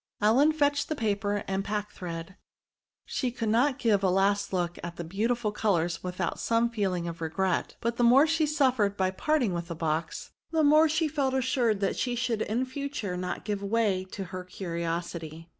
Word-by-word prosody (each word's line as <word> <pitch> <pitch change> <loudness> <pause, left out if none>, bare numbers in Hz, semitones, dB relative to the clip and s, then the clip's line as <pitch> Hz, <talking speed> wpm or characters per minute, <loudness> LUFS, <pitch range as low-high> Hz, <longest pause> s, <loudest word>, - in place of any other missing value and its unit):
Ellen 250 +9 +5
fetched 285 -2 +1
the 310 - -1
paper 205 -4 -1
and 195 0 -1
packthread; 190 -4 -5 0.7
she 255 - -1
could 230 -2 -3
not 255 +5 +3
give 220 -7 +2
a 190 - +4
last 200 +2 +2
look 175 -2 -1
at 170 0 -5
the 170 - -5
beautiful 215 +6 -1
colours 175 -6 0
without 180 -1 -3
some 230 +1 +1
feeling 190 -6 -1
of 170 0 -6
regret; 180 +3 -1
but 235 0 -1
the 245 - +2
more 255 +5 +7
she 320 0 +2
su£Fered 260 -9 +2
by 185 -1 +1
peu'ting 255 +2 +1
with 170 -1 -3
the 170 - -5
box, 160 0 -3 0.2
the 320 -1 +1
more 305 +2 +6
she 315 +1 +1
felt 280 -3 0
assured 245 -5 +1
that 195 - 0
she 245 -1 -1
should 235 -2 -1
in 235 +5 0
fature 260 -8 -4
not 180 0 -4
give 205 -2 -2
way 200 -2 +1
to 195 +1 -6
her 185 0 -4
curiosity. 170 -2 -5
205 Hz, 185 wpm, -28 LUFS, 180-250 Hz, 0.7 s, more